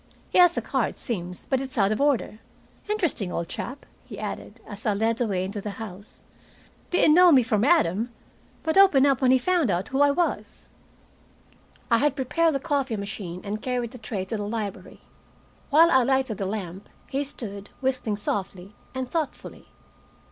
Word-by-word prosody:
He -, -, +3 dB
has 355 Hz, -1 st, +6 dB
a -, -, -1 dB
car, -, -, 0 dB
it -, -, -9 dB
seems, 180 Hz, -7 st, -5 dB
but 265 Hz, -1 st, 0 dB
it's 265 Hz, 0 st, -7 dB
out 200 Hz, -1 st, +3 dB
of 215 Hz, -, -1 dB
order. 275 Hz, -6 st, +1 dB, 0.5 s
Interesting 340 Hz, -, 0 dB
old 170 Hz, -, -3 dB
chap," 265 Hz, +3 st, -6 dB, 0.2 s
he -, -, -10 dB
added, -, -, -6 dB
as 205 Hz, +1 st, -10 dB
I 210 Hz, -, +2 dB
led 225 Hz, +2 st, +1 dB
the 240 Hz, -, 0 dB
way 185 Hz, -3 st, -1 dB
into 200 Hz, +2 st, -5 dB
the 205 Hz, 0 st, -6 dB
house. 205 Hz, -2 st, -10 dB, 0.7 s
"Didn't 335 Hz, -3 st, +4 dB
know 355 Hz, +1 st, +7 dB
me 265 Hz, -4 st, +6 dB
from 215 Hz, -2 st, +1 dB
Adam, 240 Hz, -, +3 dB, 0.5 s
but 320 Hz, +4 st, +2 dB
opened 335 Hz, -9 st, +6 dB
up 275 Hz, -2 st, +2 dB
when 260 Hz, -, +4 dB
he 260 Hz, -, +6 dB
found 335 Hz, -, +1 dB, 0.2 s
who 270 Hz, 0 st, 0 dB
I 285 Hz, -, +6 dB
was." 335 Hz, +5 st, -2 dB, 1.2 s
I 230 Hz, -, +5 dB
had 290 Hz, 0 st, +2 dB
prepared 315 Hz, +4 st, +1 dB
the -, -, 0 dB
coffee 275 Hz, -5 st, -1 dB
machine 200 Hz, -3 st, -6 dB
and 210 Hz, +1 st, -4 dB
carried 245 Hz, -2 st, -2 dB
the 250 Hz, -, -11 dB
tray 210 Hz, -4 st, -4 dB
to 220 Hz, +4 st, -3 dB
the 205 Hz, -, -3 dB
library. 210 Hz, -2 st, -5 dB, 0.7 s
While 325 Hz, +3 st, +6 dB
I 260 Hz, -, +5 dB
lighted 260 Hz, -3 st, 0 dB
the 195 Hz, -, -1 dB
lamp, 195 Hz, -2 st, -6 dB, 0.2 s
he 275 Hz, +2 st, -1 dB
stood, 205 Hz, -7 st, -7 dB
whistling 255 Hz, -6 st, -1 dB
softly, 195 Hz, -1 st, -4 dB, 0.2 s
and 260 Hz, -1 st, -3 dB
thoughtfully. 315 Hz, +1 st, -5 dB
240 Hz, 185 wpm, -25 LUFS, 205-280 Hz, 1.2 s, know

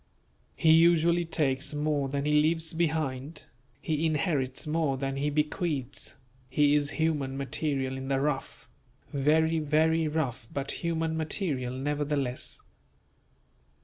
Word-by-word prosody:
He 160 Hz, -, +4 dB
usually 170 Hz, +1 st, +5 dB
takes 145 Hz, -3 st, 0 dB
more 145 Hz, -2 st, 0 dB
than 140 Hz, +1 st, -2 dB
he 150 Hz, 0 st, +4 dB
leaves 160 Hz, +1 st, +1 dB
behind; 155 Hz, -3 st, -2 dB, 0.4 s
he 155 Hz, +1 st, -2 dB
inherits 145 Hz, -4 st, 0 dB
more 155 Hz, -3 st, 0 dB
than 135 Hz, 0 st, -2 dB
he 140 Hz, +2 st, 0 dB
bequeaths; 150 Hz, -2 st, -2 dB, 0.3 s
he 145 Hz, +2 st, +3 dB
is 145 Hz, -1 st, +2 dB
human 150 Hz, -4 st, 0 dB
material 135 Hz, -1 st, -1 dB
in 135 Hz, 0 st, -6 dB
the 135 Hz, -1 st, +1 dB
rough; 140 Hz, -1 st, -3 dB, 0.5 s
very, 160 Hz, +3 st, +2 dB
very 160 Hz, +2 st, +2 dB
rough 130 Hz, -6 st, -2 dB
but 140 Hz, 0 st, -3 dB
human 165 Hz, -1 st, -1 dB
material 155 Hz, -6 st, -2 dB
nevertheless. 145 Hz, -2 st, -2 dB
150 Hz, 120 wpm, -28 LUFS, 135-160 Hz, 0.5 s, usually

